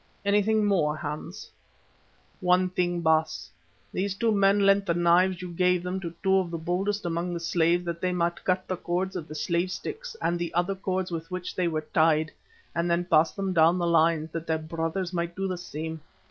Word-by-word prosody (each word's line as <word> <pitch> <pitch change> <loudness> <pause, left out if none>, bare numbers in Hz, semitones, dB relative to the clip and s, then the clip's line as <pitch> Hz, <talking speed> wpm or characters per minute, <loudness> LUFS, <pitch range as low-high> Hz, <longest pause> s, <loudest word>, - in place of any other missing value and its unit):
"Anything 210 +1 +3
more, 165 -7 +2
Hans?" 155 +3 -6 0.9
"One 185 0 +3
thing, 175 -1 0
Baas. 160 -1 +1 0.4
These 195 +1 -1
two 230 +2 +1
men 200 0 +4
lent 195 0 +4
the 170 - +1
knives 175 +1 +3
you 180 - -6
gave 180 0 +2
them 180 +1 -3
to 170 -3 -5
two 190 -1 +4
of 185 -2 0
the 170 - -4
boldest 190 +5 -2
among 175 +1 -2
the - - -3
slaves 170 +1 +1
that 170 -1 -4
they 185 - +1
might 175 -1 -1
cut 185 0 0
the 185 - -2
cords 185 +3 -2
of 165 -4 -5
the 155 - -8
slave 170 +4 0
sticks 450 - -6
and 175 - 0
the 170 -1 -3
other 175 +3 +1
cords 185 -1 -2
with 165 0 -5
which 185 -1 -5
they 180 -1 +1
were 155 -2 -1
tied, 155 -1 +3 0.4
and 170 +1 0
then 170 +1 +1
pass 160 -2 +4
them 195 -2 -2
down 165 +1 +5
the 175 - 0
lines, 165 -1 +2
that 165 0 -5
their 160 - +1
brothers 165 +3 -3
might 170 0 -2
do 195 0 -2
the 185 - -2
same. 160 -2 -6
175 Hz, 205 wpm, -27 LUFS, 165-190 Hz, 0.9 s, down